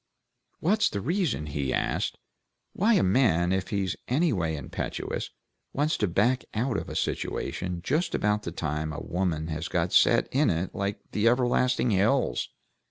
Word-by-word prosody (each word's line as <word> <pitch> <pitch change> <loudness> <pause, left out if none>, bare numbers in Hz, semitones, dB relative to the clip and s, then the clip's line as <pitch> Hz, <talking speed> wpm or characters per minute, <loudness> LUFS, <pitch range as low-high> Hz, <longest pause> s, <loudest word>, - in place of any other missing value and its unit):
What's 205 +5 +3
the 100 - -3
reason," 160 - -1
he 70 -3 -2
asked, - - -1 0.6
"why 220 +4 +3
a - - +3
man, 90 -4 +3
if 95 0 -1
he's 100 -3 -1
any 150 +4 +2
way 80 -5 -1
impetuous, 70 - -4 0.4
wants 150 +3 +1
to 105 - +1
back 120 +9 +2
out 120 +2 0
of - - -3
a - - -6
situation 90 -1 -2
just 160 - 0
about 105 0 +1
the 85 - -5
time 75 -1 -3
a 75 - -5
woman 85 -3 -2
has 80 +1 -3
got 90 +1 -1
set 115 - +5
in 145 +3 +3
it 85 +2 -1
like 100 +1 -2
the 105 +2 +1
everlasting 125 0 +2
hills? 110 +7 +1
100 Hz, 165 wpm, -27 LUFS, 85-130 Hz, 0.6 s, set